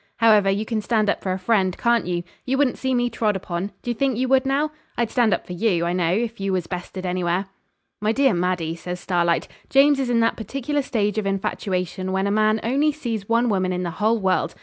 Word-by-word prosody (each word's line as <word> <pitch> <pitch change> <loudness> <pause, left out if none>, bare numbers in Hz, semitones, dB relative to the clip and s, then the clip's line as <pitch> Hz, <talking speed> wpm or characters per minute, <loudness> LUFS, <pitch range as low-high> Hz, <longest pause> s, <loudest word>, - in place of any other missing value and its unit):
However, 215 -3 +5
you 200 +3 0
can 220 -1 -2
stand 215 -1 +2
up - - -4
for 190 - -2
a 185 - -1
friend, 190 -2 +1
can't 235 -4 +2
you? 175 -1 -1 0.2
You 265 +1 -1
wouldn't 280 -3 +1
see 260 -1 0
me 245 0 +2
trod 215 -3 0
upon; 190 +1 -4
d'ye 240 - -1
think 260 0 0
you 255 +1 0
would, 265 0 +3
now? 290 +3 +1 0.3
I'd 235 -2 0
stand 240 -4 +3
up - - 0
for 180 - -7
you, 175 -3 +1
I 170 - 0
know, 175 -2 +1
if 230 +3 -1
you 195 -1 -1
was 180 -2 -1
bested 185 +1 -6
anywhere.' 180 +1 0 0.6
'My 210 +1 +2
dear 270 0 +3
Maddie,' 175 -2 -1
says 180 +1 -6
Starlight, 170 -2 0 0.2
'James 280 +1 +5
is 260 -2 -1
in 235 -1 +2
that 230 - +1
particular 275 +6 -2
stage 215 -5 -1
of 205 - -2
infatuation 185 -1 -2
when 190 +1 0
a 200 - 0
man 215 +1 +2
only 280 +6 +2
sees 230 -9 -5
one 235 +1 +3
woman 190 -4 +1
in 180 0 -2
the 175 - -3
whole 220 +2 +3
world. 185 -5 0
210 Hz, 235 wpm, -23 LUFS, 185-240 Hz, 0.6 s, However